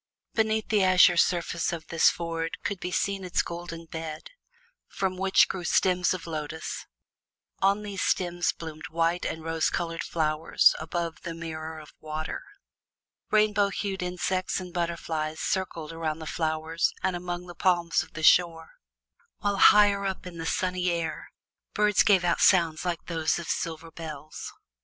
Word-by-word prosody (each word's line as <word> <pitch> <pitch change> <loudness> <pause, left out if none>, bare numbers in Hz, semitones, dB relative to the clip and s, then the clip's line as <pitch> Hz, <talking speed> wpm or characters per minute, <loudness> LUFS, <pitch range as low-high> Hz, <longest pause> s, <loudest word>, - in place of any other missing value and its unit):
Beneath 220 -1 +1
the 210 -3 +3
azure 185 -1 +6
surface 170 0 +1
of 165 -2 -5
this 165 - +5
ford 165 -1 -3
could 200 -2 -2
be 180 - -4
seen 195 +1 -1
its 180 -1 0
golden 170 -1 -7
bed, 160 - -7 0.6
from 190 -1 -2
which 190 +1 +4
grew 185 - -4
stems 180 0 +2
of 185 -2 -3
lotus; 160 -1 -5 0.7
on 200 +2 +2
those 200 -2 -5
stems 175 -1 +1
bloomed 160 -1 -8
white 165 +1 0
and 160 - -5
rose 165 0 0
colored 165 -1 -3
flowers 155 -1 +3
above 165 +1 -4
the 170 -2 -6
mirror 160 -1 -6
of 155 -1 -12
water. 155 0 -5 0.9
Rainbow 210 -1 +3
hued 195 -1 -3
insects 180 +1 -1
and 180 -2 -8
butterflies 165 -3 -2
circled 165 -4 -2
around 160 -1 -2
the 160 - -8
flowers 160 +1 -1
and 190 -1 +1
among 175 0 -4
the 175 - -9
palms 175 -1 +2
of - - -11
the 160 - -6
shore, 165 -1 +4 0.7
while 200 -1 0
higher 205 0 +6
up 190 -1 -3
in 175 -2 -8
the 165 - -3
sunny 180 0 0
air 165 -2 -3 0.5
birds 210 -1 +4
gave 195 -4 +4
out 175 - +1
sounds 165 -4 +4
like 175 -2 -3
those 160 -2 0
of 170 -2 -6
silver 165 0 -3
bells. 155 -2 -8
170 Hz, 155 wpm, -27 LUFS, 160-185 Hz, 0.9 s, azure